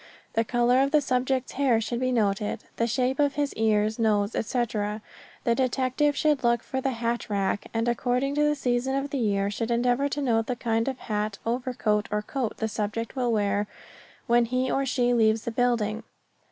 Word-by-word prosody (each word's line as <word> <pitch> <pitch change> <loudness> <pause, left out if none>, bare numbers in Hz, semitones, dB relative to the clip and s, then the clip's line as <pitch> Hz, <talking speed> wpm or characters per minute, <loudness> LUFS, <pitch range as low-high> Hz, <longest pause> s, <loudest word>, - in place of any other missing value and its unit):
The 225 - +2
color 240 +2 +2
of 275 - +2
the 300 +1 +4
subject's 260 -1 0
hair 260 -5 +2
should 235 +2 -3
be 255 0 0
noted; 210 -2 0
the 230 - +1
shape 255 +3 0
of 285 -1 +2
his 290 -1 -1
ears, 215 0 +1
nose, 210 -2 +2
etc. 215 -2 -1 0.4
The 235 - +2
detective 260 +3 +1
should 300 -4 +2
look 235 -1 +2
for 265 -1 -3
the 270 - 0
hat 235 0 -2
rack, 200 0 -1
and 225 +1 -1
according 250 +3 0
to 295 - +1
the 295 0 +2
season 255 -1 0
of 275 +1 -2
the 280 - -1
year 200 -3 +1
should 225 +2 -3
endeavor 245 +4 +1
to 285 - -3
note 225 -3 +1
the 250 - -1
kind 225 -1 0
of 265 -1 -2
hat, 210 -2 -3
overcoat 230 -3 0
or 210 0 -1
coat 250 0 -3
the 220 - -1
subject 215 +3 -3
will 250 -2 0
wear 205 -1 +1 0.6
when 240 -1 +4
he 255 +2 -1
or 275 0 0
she 245 -1 +2
leaves 220 -2 +3
the 235 - -3
building. 230 -3 0
240 Hz, 195 wpm, -26 LUFS, 220-260 Hz, 0.6 s, the